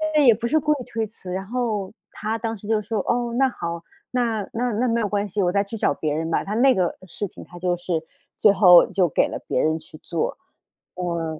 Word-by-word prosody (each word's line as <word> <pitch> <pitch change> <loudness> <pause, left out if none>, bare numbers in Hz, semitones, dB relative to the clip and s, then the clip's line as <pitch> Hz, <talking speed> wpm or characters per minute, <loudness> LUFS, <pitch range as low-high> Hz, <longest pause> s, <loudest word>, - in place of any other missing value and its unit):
对， 300 -2 +5
也 240 - +8
不 235 +2 -3
是 315 - +3
故 300 0 +2
意 275 - -5
推 225 -2 -3
辞。 195 -4 -10
然 190 +1 -3
后 215 -4 -2 0.2
他 220 +1 -3
当 225 -1 -3
时 205 +1 -12
就 220 -1 +2
说， 215 +2 -3
哦， 240 +3 -1
那 270 0 +4
好 170 -8 -5 0.3
那 235 -4 0
那 245 +1 0
那 235 +4 0
没 235 0 +1
有 215 - 0
关 205 0 -1
系， 200 +1 0
我 175 - +2
再 200 +1 +2
去 205 +3 -7
找 175 - +2
别 150 0 -2
人 160 +1 -2
吧， - - +1
他 210 +2 -4
那 260 +2 +5
个 180 -2 0
事 200 +4 -4
情 - - -12
他 175 - -12
就 180 0 +1
是 175 -2 -2 0.3
最 210 - +5
后 180 -3 +8
就 185 -3 +3
给 - - +2
了 - - -5
别 - - +1
人 155 +1 +1
去 155 -1 -14
做， 165 -2 -2 0.6
呃。 170 -3 -3
205 Hz, 265 characters per minute, -23 LUFS, 175-235 Hz, 0.6 s, 也